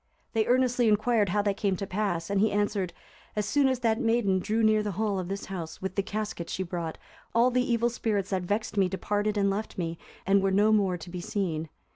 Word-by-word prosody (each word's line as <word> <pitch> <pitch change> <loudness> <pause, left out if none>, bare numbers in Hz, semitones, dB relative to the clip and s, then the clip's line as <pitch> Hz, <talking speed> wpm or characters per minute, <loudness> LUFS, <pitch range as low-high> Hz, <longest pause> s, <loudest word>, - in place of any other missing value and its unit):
They 220 -1 +1
earnestly 245 -1 +3
inquired 215 -1 +3
how 205 +3 +1
that 200 -1 0
came 195 -2 +1
to 195 - -4
pass, 185 -3 -2
and 200 -1 +2
he 215 0 +3
answered, 205 -3 0 0.4
"As 210 -1 0
soon 280 +5 +3
as 260 -2 0
that 225 0 +1
maiden 225 -5 +2
drew 220 +4 0
near 215 0 +4
the 210 -1 -3
hall 205 0 0
of 180 - -4
this 195 +1 -4
house, 170 -4 -6
with 190 -1 -4
the 200 - +2
casket 210 -3 -4
she 190 - -2
brought, 170 -2 -4 0.4
all 240 +2 +5
the 250 0 +1
evil 235 +1 +2
spirits 205 -4 -1
that 190 -1 +1
vexed 205 +4 -2
me 190 -2 +3
departed 205 +2 -1
and 200 -1 +3
left 210 +3 -4
me, 165 -2 -3 0.3
and 195 +1 +4
were 195 - +2
no 205 +3 +4
more 195 -4 +2
to 175 +1 -10
be 180 0 -5
seen." 165 -5 -2
205 Hz, 230 wpm, -28 LUFS, 190-220 Hz, 0.4 s, all